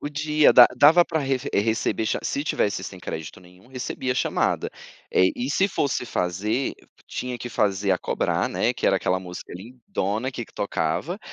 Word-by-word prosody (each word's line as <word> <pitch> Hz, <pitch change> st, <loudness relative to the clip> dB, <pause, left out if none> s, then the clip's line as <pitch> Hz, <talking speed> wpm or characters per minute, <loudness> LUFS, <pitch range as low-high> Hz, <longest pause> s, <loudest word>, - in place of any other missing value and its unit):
Podia 150 Hz, +1 st, +2 dB
da 120 Hz, -, +10 dB
dava 160 Hz, +7 st, +6 dB
para 160 Hz, -, -2 dB
reve 135 Hz, -3 st, -2 dB
receber 110 Hz, +1 st, 0 dB
cha -, -, 0 dB
se 140 Hz, -, -2 dB
tivesse 100 Hz, -, -1 dB
sem 95 Hz, 0 st, -8 dB
crédito 80 Hz, -2 st, -7 dB
nenhum, 90 Hz, +3 st, -19 dB
recebia 130 Hz, 0 st, -3 dB
chamada. -, -, 0 dB, 0.4 s
Eh, 95 Hz, -, +5 dB
e 125 Hz, +3 st, -2 dB
se 195 Hz, +7 st, +2 dB
fosse 135 Hz, -7 st, -1 dB
fazer, 105 Hz, +9 st, -1 dB, 0.3 s
tinha 125 Hz, -1 st, -4 dB
que 120 Hz, +1 st, -6 dB
fazer 100 Hz, -2 st, 0 dB
a 90 Hz, -, +3 dB
cobrar, -, -, -1 dB
né, -, -, 0 dB
que -, -, -2 dB
era -, -, +4 dB
aquela 95 Hz, 0 st, 0 dB
música 90 Hz, -1 st, -9 dB
lindona 115 Hz, +2 st, -4 dB
que 120 Hz, -, -5 dB
que -, -, -24 dB
tocava, 100 Hz, -, -2 dB
120 Hz, 175 wpm, -24 LUFS, 95-135 Hz, 0.4 s, da